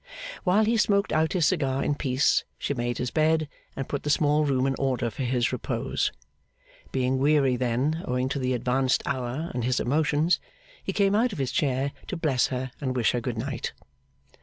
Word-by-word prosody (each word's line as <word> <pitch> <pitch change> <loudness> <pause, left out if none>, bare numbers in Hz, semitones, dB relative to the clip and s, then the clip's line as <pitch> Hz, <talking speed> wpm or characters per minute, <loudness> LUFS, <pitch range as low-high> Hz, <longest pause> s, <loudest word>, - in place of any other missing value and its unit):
While 200 +4 +4
he 230 +2 +2
smoked 200 -1 +2
out 160 +1 +2
his 175 -5 +2
cigar 135 -7 +1
in - - +1
peace, 135 -2 +2
she - - -2
made 120 -2 -2
his 125 - -2
bed, 155 0 +2 0.3
and 135 - -4
put 140 - -3
the 150 - -3
small 150 0 +3
room 135 -2 +1
in 135 - +1
order 130 -3 0
for 120 - -7
his 125 -1 +1
repose. - - -1 0.8
Being 130 0 +1
weary 140 -2 +3
then, 130 +6 0
owing 125 +1 0
to 140 - -2
the 130 -1 0
advanced 130 +2 +1
hour 130 +5 -3
and 125 - -2
his 125 +1 +1
emotions, 150 +5 +2 0.4
he - - -2
came 200 -1 +2
out 225 +2 +2
of - - -6
his 135 -3 -1
chair 135 -1 0 0.2
to - - -3
bless 140 -6 +2
her 130 0 -4
and 130 -2 -2
wish 120 -3 +3
her 120 - -1
Good 120 -1 -3
night. 110 - -3
135 Hz, 195 wpm, -26 LUFS, 125-155 Hz, 0.8 s, While